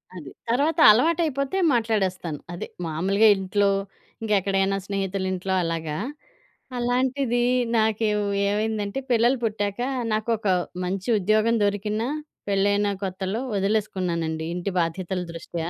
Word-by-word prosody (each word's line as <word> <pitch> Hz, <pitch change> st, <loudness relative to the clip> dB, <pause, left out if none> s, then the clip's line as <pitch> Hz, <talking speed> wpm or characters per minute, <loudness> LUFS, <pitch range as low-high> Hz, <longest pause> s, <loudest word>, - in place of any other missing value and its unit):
అది. 150 Hz, -7 st, -9 dB, 0.2 s
తర్వాత 290 Hz, +8 st, +1 dB
అలవాటయిపోతే 305 Hz, -, +1 dB, 0.2 s
మాట్లాడేస్తాను, 190 Hz, -9 st, -1 dB
అదే 175 Hz, -, -5 dB, 0.2 s
మాములుగా 190 Hz, +7 st, +2 dB
ఇంట్లో, 200 Hz, +1 st, +1 dB, 0.5 s
ఇంకెక్కడైనా 195 Hz, -2 st, +1 dB
స్నేహితులింట్లో 190 Hz, -1 st, -2 dB
అలాగా. 165 Hz, -2 st, -3 dB, 0.8 s
అలాంటిదీ 245 Hz, 0 st, +1 dB, 0.3 s
నాకెవ్ 215 Hz, -1 st, +1 dB, 0.3 s
ఏవైందంటే, 210 Hz, +2 st, -1 dB
పిల్లలు 240 Hz, +3 st, +4 dB
పుట్టాకా 210 Hz, +2 st, -1 dB, 0.2 s
నాకొకా 215 Hz, -2 st, +1 dB, 0.3 s
మంచి 190 Hz, +4 st, -3 dB
ఉద్యోగం 215 Hz, +4 st, +2 dB
దొరికినా, 210 Hz, +3 st, -1 dB, 0.4 s
పెళ్లైన 200 Hz, +1 st, +2 dB, 0.2 s
కొత్తలో 190 Hz, +3 st, -3 dB, 0.2 s
ఒదిలేసుకున్నానండీ, 180 Hz, -6 st, -1 dB
ఇంటి 180 Hz, +3 st, -3 dB
బాధ్యతల 180 Hz, +2 st, -1 dB
దృష్ట్యా. 165 Hz, 0 st, -5 dB
205 Hz, 95 wpm, -24 LUFS, 185-225 Hz, 0.8 s, పిల్లలు